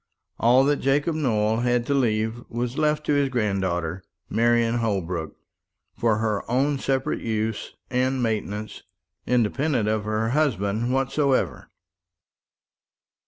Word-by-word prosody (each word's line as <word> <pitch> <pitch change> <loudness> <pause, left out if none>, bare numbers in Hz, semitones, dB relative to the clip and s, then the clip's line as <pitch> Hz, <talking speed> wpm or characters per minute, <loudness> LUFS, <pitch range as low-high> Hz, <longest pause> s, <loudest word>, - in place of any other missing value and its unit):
All 125 +3 +5
that 145 +1 +2
Jacob 145 +4 +1
Nowell 110 -7 +1
had 120 0 +1
to 140 - 0
leave 115 -2 0
was 120 +1 -3
left 150 0 +1
to - - +1
his 140 -1 +2
granddaughter, 95 -7 -1 0.3
Marian 120 0 +2
Holbrook, 90 -7 -2 0.6
for 115 -2 +1
her 110 -2 0
own 135 +3 +1
separate 135 0 -1
use 110 -1 -3 0.2
and 130 0 +1
maintenance, 105 -2 -3 0.5
independent 125 +1 +1
of 105 -1 -1
any 110 +1 0
husband 120 -5 0
whatsoever. 135 - 0
120 Hz, 115 wpm, -24 LUFS, 105-135 Hz, 0.6 s, All